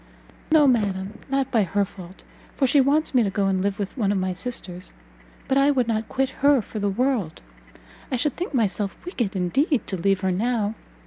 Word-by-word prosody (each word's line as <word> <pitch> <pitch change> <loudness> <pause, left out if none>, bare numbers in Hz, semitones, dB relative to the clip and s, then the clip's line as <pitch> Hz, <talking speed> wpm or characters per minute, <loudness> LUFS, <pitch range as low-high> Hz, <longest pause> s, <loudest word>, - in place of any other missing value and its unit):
"No, 310 -2 +6
madam, 205 -5 0
not 270 -1 0
by 230 - +3
her 200 +1 +1
fault, 185 -1 -12 0.3
for 275 - +2
she 275 +2 +4
wants 290 +4 +2
me 250 - +5
to 210 - +1
go 200 0 0
and 190 -1 +1
live 200 0 -1
with 200 -3 -4
one 210 -7 +1
of 205 - +1
my 185 0 -1
sisters: 185 -4 -5 0.5
but 270 - +3
I 275 +1 +4
would 255 -5 +2
not 220 -1 -1
quit 270 0 0
her 285 -1 +6
for 215 - -6
the 205 0 0
world; 225 - -1 0.7
I - - +1
should 255 +3 0
think 360 - -4
myself 205 - 0
wicked 240 - -2
indeed 245 - +1
to 190 - -3
leave 195 +2 +1
her 190 -1 +1
now. 215 +2 0
215 Hz, 205 wpm, -24 LUFS, 195-265 Hz, 0.7 s, No